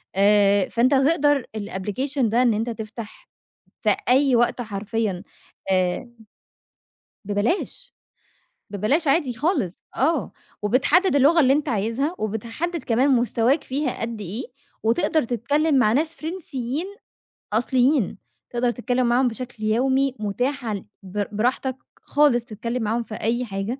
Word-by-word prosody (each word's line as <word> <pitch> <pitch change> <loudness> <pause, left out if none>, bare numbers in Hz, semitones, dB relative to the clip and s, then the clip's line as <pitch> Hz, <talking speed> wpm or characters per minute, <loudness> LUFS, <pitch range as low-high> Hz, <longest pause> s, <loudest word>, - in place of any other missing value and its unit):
آآ، 200 -1 +4
فأنت 245 +4 +2
هتقدر 290 0 +3
الapplication 215 +8 -3
ده 230 +1 +3
إن 240 -3 +3
أنت 225 +3 -1
تفتح 220 -1 -8 0.5
في - - +3
أي 265 0 +4
وقت 240 +1 +2
حرفيًا 210 -2 -3 0.5
آآ 185 +4 0 1.2
ببلاش، 205 - -2 0.8
ببلاش 265 - 0
عادي 275 -3 +2
خالص 230 - -1 0.2
آه، 330 - +1 0.3
وبتحدد 280 - +3
اللغة 295 +5 +5
اللي 265 -1 +5
أنت 295 +1 0
عايزها 230 - -1
وبتحدد 230 - -3
كمان 250 +4 +2
مستواك 245 +3 +2
فيها 270 0 -2
قدّ 225 -2 -4
إيه، 205 +7 -5 0.4
وتقدر 300 +6 +2
تتكلم 280 +7 +1
مع 215 -3 +3
ناس 310 +5 +1
فرنسيين 310 -3 -4 0.7
أصليين، 250 - +2 0.3
تقدر 240 0 +1
تتكلم 245 +1 0
معاهم 250 +2 +3
بشكل 235 -1 -7
يومي 260 +4 +2
متاح 245 +6 -2
عل 210 -3 -3 0.2
بر 200 +2 -3
براحتك 250 +4 -1 0.2
خالص 275 -5 +2
تتكلم 230 +2 -4
معاهم 230 +3 0
في 220 - -8
أي 240 +4 -1
حاجة. 205 +5 -4
240 Hz, 125 wpm, -23 LUFS, 215-275 Hz, 1.2 s, اللغة